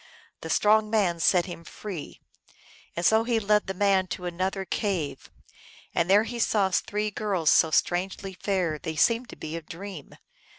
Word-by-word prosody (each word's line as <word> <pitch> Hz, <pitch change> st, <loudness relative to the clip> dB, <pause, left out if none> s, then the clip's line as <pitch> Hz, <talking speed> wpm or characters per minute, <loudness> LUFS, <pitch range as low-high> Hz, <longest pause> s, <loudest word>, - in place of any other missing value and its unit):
The -, -, -7 dB
strong 215 Hz, +1 st, +3 dB
man 195 Hz, -6 st, +1 dB
set 175 Hz, +1 st, +3 dB
him 175 Hz, -2 st, -8 dB
free. 180 Hz, -3 st, -8 dB, 0.7 s
And 170 Hz, -, -2 dB
so 220 Hz, +1 st, +5 dB
he 230 Hz, -1 st, +1 dB
led 210 Hz, 0 st, +2 dB
the 190 Hz, -, -3 dB
man 195 Hz, -1 st, +2 dB
to 180 Hz, -, -6 dB
another 185 Hz, +2 st, -2 dB
cave, 165 Hz, -11 st, -3 dB, 0.6 s
and 170 Hz, +1 st, 0 dB
there 205 Hz, +2 st, +6 dB
he 235 Hz, +1 st, -6 dB
saw 200 Hz, -4 st, +2 dB
three 210 Hz, +3 st, -1 dB
girls 190 Hz, -7 st, +1 dB
so 160 Hz, -, +5 dB
strangely 185 Hz, +4 st, 0 dB
fair 180 Hz, -5 st, -1 dB
they 160 Hz, -, -5 dB
seemed 230 Hz, +9 st, +2 dB
to -, -, -9 dB
be 155 Hz, +1 st, -6 dB
a 165 Hz, -, -4 dB
dream. 175 Hz, -1 st, -9 dB
190 Hz, 170 wpm, -26 LUFS, 170-210 Hz, 0.7 s, there